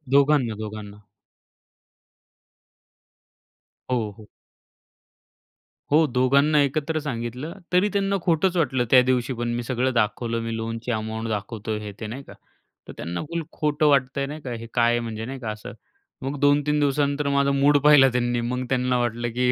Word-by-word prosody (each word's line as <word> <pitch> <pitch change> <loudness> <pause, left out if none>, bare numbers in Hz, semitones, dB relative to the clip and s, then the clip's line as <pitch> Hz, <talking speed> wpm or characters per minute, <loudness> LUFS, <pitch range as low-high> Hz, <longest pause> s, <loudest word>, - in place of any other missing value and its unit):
दोघांना, 140 -5 +3
दोघांना. 105 -1 -7 2.9
हो, 115 -4 0
हो. 105 - -14 1.6
हो, 155 +2 +5
दोघांना 140 +4 +3
एकत्र 155 +3 0
सांगितलं 125 +3 -5 0.2
तरी 185 +4 +4
त्यांना 200 0 0
खोटंच 175 +2 +1
वाटलं 130 -6 +1
त्या 130 -1 +8
दिवशी, 125 0 +1
पण 120 0 -3
मी 120 - -3
सगळं 130 +1 -1
दाखवलं. 115 +1 0
मी 115 0 -3
लोनची 115 +2 -4
अमाउंट 110 0 -3
दाखवतोय 110 +1 -3
हे 105 -1 -7
ते 110 - -5
नाही 130 +5 -7
का. - - -13 0.5
तर - - -8
त्यांना 85 +2 -4
फुल 170 0 -2
खोटं 150 0 0
वाटतंय 140 0 +2
नाही 150 +3 -7
का, 130 -4 -6
हे 115 0 -6
काय 120 -1 +3
आहे 120 - +1
म्हणजे 110 -1 -5
नाही 135 +2 -6
का 115 -4 -5
असं. 105 0 -8 0.5
मग 135 +2 -4
2-3 145 +1 +3
दिवसानंतर 145 0 +1
माझा 140 0 +2
मूड 140 +1 +4
पाहिला 145 -3 +7
त्यांनी. 120 0 0
मग 125 +2 -2
त्यांना 125 -1 +1
वाटलं, 120 0 -1
की 125 0 +2
125 Hz, 155 wpm, -24 LUFS, 115-145 Hz, 2.9 s, त्या